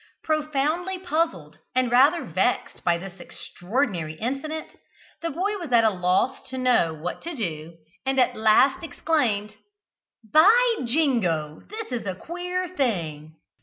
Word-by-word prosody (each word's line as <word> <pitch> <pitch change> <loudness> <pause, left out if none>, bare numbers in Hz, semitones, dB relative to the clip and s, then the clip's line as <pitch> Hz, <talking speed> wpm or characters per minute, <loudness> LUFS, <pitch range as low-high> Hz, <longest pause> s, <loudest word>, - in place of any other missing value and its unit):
Profoundly 310 +4 0
puzzled, 315 - -2 0.2
and 255 -2 +2
rather 280 +8 +5
vexed - - -1
by 170 -1 +2
this 190 +1 -10
extraordinary 180 - -3
incident, 275 - -4 0.5
the 335 - -2
boy 390 +7 -2
was 335 -7 -7
at 235 -1 +5
a 220 - +4
loss 180 +6 +1
to 260 - -6
know 250 -10 +3
what 160 +3 -6
to 340 -1 -6
do, 165 - -5 0.3
and 270 0 0
at 250 -1 +3
last 220 +8 +4
exclaimed: 240 -10 0 0.8
"By 455 +9 +6
Jingo, 220 - 0
this 435 -4 -7
is 235 -4 -3
a 190 - -2
queer 360 - -4
thing!" 165 - -2
255 Hz, 135 wpm, -25 LUFS, -, 0.8 s, By